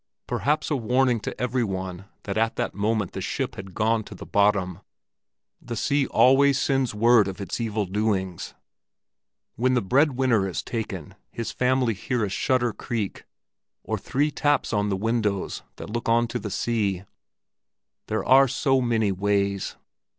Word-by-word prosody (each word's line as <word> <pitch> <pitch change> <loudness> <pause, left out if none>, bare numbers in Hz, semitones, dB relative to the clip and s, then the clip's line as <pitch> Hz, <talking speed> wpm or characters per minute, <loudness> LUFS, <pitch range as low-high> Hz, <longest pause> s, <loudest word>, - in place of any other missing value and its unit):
Perhaps 150 +2 0
a - - +3
warning 125 0 +2
to - - -6
every 125 +1 0
one 95 -2 -4 0.2
that 100 - -4
at 115 +1 +1
that - - -2
moment 105 -1 0
the - - -5
ship - - -2
had 95 -1 -9
gone 110 +1 +1
to - - -10
the - - -9
bottom? 100 -4 +1 0.8
The 120 - -6
sea 140 +3 +1
always 135 +1 +5
sends 135 -5 0
word 115 -1 +5
of 95 0 -6
its 100 +4 -4
evil 110 -2 -1
doings; 95 -2 -2 1.0
when 130 +3 +2
the 125 - +2
bread 140 +9 +3
winner 125 -6 +2
is 85 - -4
taken 100 -9 -5 0.2
his 115 - -4
family 125 -2 +1
hear 110 +3 -1
a - - -4
shutter 120 +3 +1
creak, 110 -4 -4 0.6
or - - -2
three 145 +3 0
taps 145 -4 +1
on 105 -1 +1
the 95 - 0
windows 105 -2 -1
that - - -8
look 120 0 -2
on 120 +1 +3
to - - -3
the 105 - -5
sea—there 100 0 -5
are 135 +2 +6
so 135 +1 +1
many 115 -4 +1
ways. 100 0 0
110 Hz, 160 wpm, -25 LUFS, 100-125 Hz, 1.0 s, are